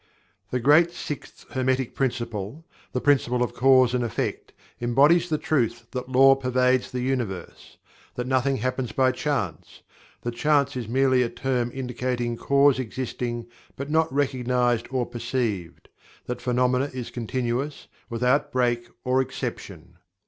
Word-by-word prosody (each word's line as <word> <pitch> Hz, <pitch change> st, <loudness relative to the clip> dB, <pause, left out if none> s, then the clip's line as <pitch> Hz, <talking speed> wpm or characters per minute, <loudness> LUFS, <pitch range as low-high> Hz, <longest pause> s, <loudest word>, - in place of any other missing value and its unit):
The 125 Hz, -, -1 dB
great 150 Hz, +7 st, +5 dB
Sixth 150 Hz, -4 st, -7 dB
Hermetic 130 Hz, -1 st, 0 dB
Principle 120 Hz, +1 st, -3 dB, 0.3 s
the 125 Hz, -, -1 dB
Principle 125 Hz, -3 st, +2 dB
of 125 Hz, -, -3 dB
Cause 130 Hz, -1 st, +5 dB
and 125 Hz, -1 st, +1 dB
Effect 115 Hz, -, -3 dB, 0.3 s
embodies 145 Hz, +9 st, +4 dB
the 155 Hz, -, +1 dB
truth 120 Hz, -6 st, 0 dB
that 125 Hz, -1 st, -5 dB
Law 135 Hz, +1 st, +7 dB
pervades 130 Hz, -1 st, +1 dB
the 125 Hz, -, -3 dB
Universe; 120 Hz, -9 st, -4 dB, 0.4 s
that 125 Hz, -, -3 dB
nothing 130 Hz, +1 st, +1 dB
happens 130 Hz, 0 st, -2 dB
by 130 Hz, -1 st, +3 dB
Chance; 125 Hz, -, -3 dB, 0.4 s
that 120 Hz, -, -3 dB
Chance 140 Hz, +2 st, +2 dB
is 120 Hz, -4 st, -4 dB
merely 130 Hz, +1 st, +3 dB
a 120 Hz, -, +1 dB
term 125 Hz, -2 st, -1 dB
indicating 125 Hz, -2 st, -2 dB
cause 140 Hz, +2 st, +3 dB
existing 120 Hz, -1 st, -4 dB, 0.3 s
but 140 Hz, +2 st, -5 dB
not 160 Hz, -1 st, +2 dB
recognized 125 Hz, -3 st, +1 dB
or 130 Hz, -1 st, 0 dB
perceived; 115 Hz, -7 st, -3 dB, 0.4 s
that 125 Hz, 0 st, -4 dB
phenomena 125 Hz, +2 st, +1 dB
is 125 Hz, -2 st, -6 dB
continuous, 125 Hz, +4 st, -3 dB, 0.2 s
without 125 Hz, +4 st, +1 dB
break 120 Hz, -2 st, 0 dB
or 130 Hz, +1 st, +2 dB
exception. 130 Hz, -, -6 dB
125 Hz, 135 wpm, -25 LUFS, 120-135 Hz, 0.4 s, Law